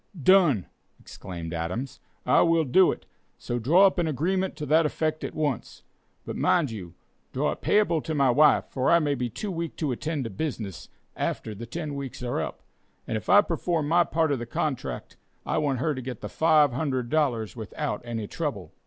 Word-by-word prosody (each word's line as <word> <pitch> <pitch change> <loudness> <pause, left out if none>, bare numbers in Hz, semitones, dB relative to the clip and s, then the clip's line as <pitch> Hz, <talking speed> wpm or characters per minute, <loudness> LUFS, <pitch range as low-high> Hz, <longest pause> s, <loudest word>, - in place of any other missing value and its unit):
"Done!" 155 - +4 0.3
exclaimed 85 -3 -8
Adams, 110 +11 -4 0.3
"I - - +5
will 165 -1 +3
do 180 +7 +5
it, - - -8 0.3
so 120 0 -3
draw 165 - +5
up 190 -2 +3
an 170 - +1
agreement 185 +6 -1
to 150 - -5
that 155 +3 +4
effect 155 0 -1
at - - -5
once. 145 -6 -3 0.4
But - - -5
mind 160 -8 +2
you, 90 -6 -8 0.4
draw - - +1
it - - -7
payable 190 -7 +2
to 160 +1 -4
my 135 -3 +4
wife, 150 +4 +5
for 130 -1 -1
I 170 - +7
may 150 -3 +1
be 125 -3 -2
too 200 - -5
weak 170 -2 -4
to 150 -4 -2
attend 150 +3 -2
to 115 - -5
business 105 - -5 0.3
after 110 - -3
the 115 +3 -8
ten 155 +3 -5
weeks 140 -3 -6
are 120 - -1
up, - - -6 0.4
and - - -2
if 110 - -5
I 205 - +8
perform 165 -4 -1
my 175 +1 +5
part 160 -2 0
of 140 - 0
the 120 - -6
contract, 135 +2 -3 0.3
I - - 0
want 145 -3 0
her 150 +5 0
to 130 - -5
get 125 -3 -7
the 105 - -4
$500 140 -5 +1
without 105 -2 -4
any 115 -3 -4
trouble." - - -4
145 Hz, 195 wpm, -26 LUFS, 120-160 Hz, 0.4 s, I